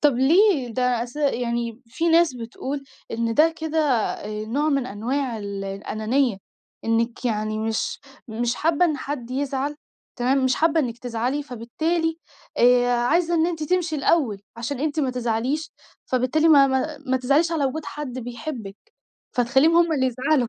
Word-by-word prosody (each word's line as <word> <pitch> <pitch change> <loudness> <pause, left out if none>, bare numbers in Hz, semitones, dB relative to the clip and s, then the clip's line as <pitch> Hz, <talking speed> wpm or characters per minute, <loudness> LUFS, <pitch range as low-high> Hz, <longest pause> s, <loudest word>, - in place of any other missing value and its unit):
طب 295 -3 +4
ليه؟ 305 - +4
ده 245 0 0
أس 245 +3 -8
يعني 240 -4 -1
في 320 +9 -1
ناس 330 -4 +4
بتقول 260 +4 -5 0.3
إن 230 0 -1
ده 320 +4 +4
كده 320 0 -1
آآ 215 -6 -1
نوع 285 +7 0
من 275 -4 +1
أنواع 240 +3 -2
ال 200 -1 -5
الأنانية، 215 +4 -1 0.5
إنِك 230 +2 0
يعني 215 -2 -1
مش 220 0 -2 0.3
مش 235 +2 -1
حابة 325 +5 +2
إن 315 -4 +1
حد 265 -3 -5
يزعل، 275 +2 -2 0.4
تمام، 260 +2 +2
مش 260 -1 +3
حابة 325 0 +2
إنِك 240 -4 -3
تزعلي، 245 +4 -2
فبالتالي 320 +7 -2 0.4
آآ، 245 0 +5
عايزة 330 +8 +2
إن 325 0 +3
أنتِ 330 -3 -3
تمشي 345 -1 0
الأول 270 -8 +1 0.2
عشان 245 +3 -4
أنتِ 310 +1 0
ما 270 -3 +1
تزعليش، 250 +5 -2 0.3
فبالتالي 255 +6 +2
ما 285 -3 +7
ما 265 +3 -1
ما 260 0 +2
تزعليش 285 +6 +2
على 310 -4 +1
وجود 295 +4 -2
حد 275 -4 -6
بيحبِك، 240 -3 -6 0.6
فتخليهم 265 +7 +4
هُم 340 -1 +4
اللي 265 -3 +1
يزعلوا، 260 +1 +1
260 Hz, 160 wpm, -23 LUFS, 235-305 Hz, 0.6 s, ما